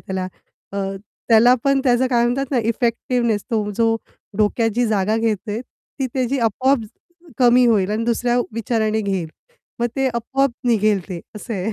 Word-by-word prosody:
त्याला. 190 -1 -4 0.5
अ, 200 - -3 0.5
त्याला 235 +2 +6
पण 275 0 +3
त्याचं 250 0 +3
काय 240 -2 +2
म्हणतात 260 +2 -1
ना, 265 - +1
इफेक्टिव्हनेस 235 -1 0
तो 220 -3 +1
जो 225 -1 +2 0.4
डोक्यात 225 +2 +2
जी 245 0 +2
जागा 215 0 +1
घेतेय, 220 0 -1
ती 260 +1 -7
त्याची 260 +1 0
आपोआप 255 +4 +2 0.6
कमी 245 0 +5
होईल 210 -4 +2
आणि 220 +2 -1
दुसऱ्या 240 +1 +1
विचाराने 220 -1 0
घेईल. 190 -5 -2 0.5
मग 240 - +2
ते 270 0 +1
आपोआप 270 +4 0
निघेल. 215 -4 +2
ते 175 -3 -5 0.2
असं 230 +3 -7
आहे. 195 +4 -2
230 Hz, 160 wpm, -20 LUFS, 215-245 Hz, 0.6 s, त्याला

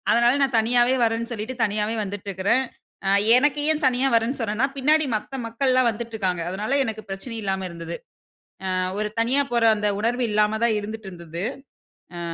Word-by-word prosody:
அதனால 235 +1 +5
நான் 270 -3 +2
தனியாவே 240 +3 +3
வர்றேன்னு 230 +1 0
சொல்லிட்டு 230 +3 -4
தனியாவே 210 +1 0
வந்துட்டுருக்கிறேன். 200 +4 -1 0.4
அ - - +3 0.3
எனக்கு 290 +3 +3
ஏன் 310 0 -1
தனியா 260 +1 +2
வர்றேன்னு 230 +4 +1
சொன்னேன்னா, 225 +2 0
பின்னாடி 305 +3 +3
மத்த 215 +5 -3
மக்கள்லாம் 255 +2 +2
வந்துட்டுருக்காங்க. 215 -6 -3
அதனால 210 +9 -1
எனக்கு 220 -3 -4
பிரச்சனை 195 +5 -6
இல்லாம 190 -1 -2
இருந்தது. 170 0 -7 0.8
அ - - 0 0.2
ஒரு 210 0 0
தனியா 255 +5 +3
போற 235 -1 +2
அந்த 210 0 0
உணர்வு 240 +3 0
இல்லாம 210 +1 +2
தான் 235 -2 +3
இருந்துட்டுருந்தது. 190 -6 -7 0.8
அ, - - -4
225 Hz, 155 wpm, -23 LUFS, 205-250 Hz, 0.8 s, அதனால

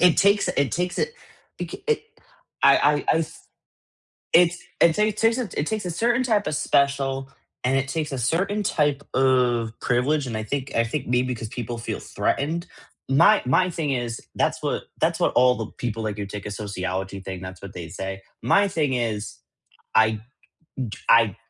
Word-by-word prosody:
it 180 -2 +5
takes 200 +1 +4
it 140 -1 0
takes 180 +1 -1
it 470 - 0 0.5
it - - -2
k - - -9 0.8
I - - +7
I 145 - +4 0.2
I - - +4
s 165 - -4 0.9
it's 175 +1 +4 0.2
it 165 -1 +6 0.2
takes 225 +3 +3
it 195 -10 -2
takes 215 +1 -2
a 180 - -2
certain 235 +8 +1
type 220 -5 +1
of - - -1
special 135 -2 +1 0.3
and 130 +2 +2
it 135 0 0
takes 155 -1 -2
a 135 - -2
certain 190 - 0
type 145 -6 +1
of 125 -3 +3
privilege, 135 +4 +1
and 115 - -4
I 110 - -2
think 135 +4 -4
I 115 - +3
think 130 +3 -3
maybe 125 +1 +1
'cause 115 -2 -6
people 120 0 -5
feel 115 - -4
threatened. 165 +5 -1 0.4
My 170 +11 +6
my 180 +8 +3
thing 155 -4 -2
is, 120 -2 -2
that's - - 0
what - - -1 0.2
that's - - +2
what - - +2
all 125 0 +5
the 110 - -4
people 115 -2 -3
like 105 -1 -3
you 100 - -3
take 105 0 -7
a - - -4
sociology 95 -1 -4
thing, 95 -1 -6
that's 95 0 -9
what 100 -1 -8
they 85 -2 -6
say. 95 +2 -5 0.2
My 200 - +4
thing 155 -7 0
is, 110 -4 -2 0.6
I 110 -1 +4 0.6
d 120 -5 -4
I 115 -3 +6
130 Hz, 185 wpm, -24 LUFS, 110-165 Hz, 0.9 s, I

